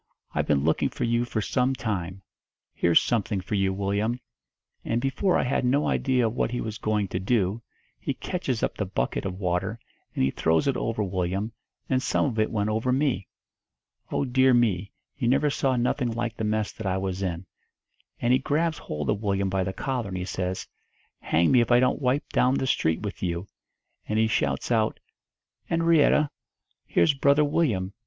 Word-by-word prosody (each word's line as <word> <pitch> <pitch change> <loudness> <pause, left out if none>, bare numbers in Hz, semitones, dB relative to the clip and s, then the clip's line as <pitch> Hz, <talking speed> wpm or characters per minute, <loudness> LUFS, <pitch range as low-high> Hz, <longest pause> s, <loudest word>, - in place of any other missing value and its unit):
I've - - 0
been 70 -2 +2
looking 80 +1 +2
for - - -5
you 120 +1 +1
for 110 -2 -2
some 130 +4 +1
time. 95 -6 -3 0.5
Here's 85 -1 +4
something 110 -3 0
for 95 +3 -6
you, 95 -2 +2
Willyum.' 100 +5 -1 0.6
And 115 - 0
before 135 +9 +1
I - - +1
had 130 +1 0
no 135 +4 +2
idea 130 -3 +2
of 110 - 0
what - - 0
he 120 +1 -3
was 110 +1 -4
going 105 -3 0
to 90 - -2
do, 100 +1 0 0.4
he - - -3
catches - - -3
up - - 0
the - - -2
bucket - - -2
of 95 -1 -3
water 95 +4 -1 0.4
and - - +1
he 65 - +2
throws 80 - +1
it 135 - +2
over 115 -3 -1
Willyum, 95 +3 -2 0.4
and 130 -1 +1
some - - +1
of 120 -6 -2
it 110 - +2
went 105 -1 -1
over 110 +4 0
me. 130 -7 0 0.8
Oh, - - 0
dear 130 0 +4
me, 105 -5 +1 0.3
you 120 - -1
never 140 +4 +3
saw 135 -2 +1
nothing 125 +1 0
like 115 0 -3
the - - -4
mess 110 0 0
that 110 - -6
I 95 0 0
was 95 0 -3
in! 90 -1 -3 0.7
And 120 +1 +2
he 130 - +4
grabs 155 +4 0
hold 75 -2 -5
of 105 - -2
Willyum 100 -2 0
by 95 0 +1
the 95 - -2
collar, 125 +2 -3
and 95 -1 -4
he 90 - -3
says, 95 0 -3 0.5
'Hang 85 +1 +2
me 125 -2 +6
if 120 - 0
I 120 0 +6
don't 130 +3 +2
wipe 130 +2 +1
down 130 +1 +3
the 135 - 0
street 80 -10 +1
with 105 -1 -5
you!' 85 0 -2 0.6
And 105 - -1
he 110 - +4
shouts 110 +2 0
out, 110 -2 +1 0.7
''Enrietta, 165 -3 +3 0.6
here's 85 - +3
Brother 140 +2 +4
Willyum. 120 - 0
110 Hz, 195 wpm, -26 LUFS, 95-130 Hz, 0.8 s, me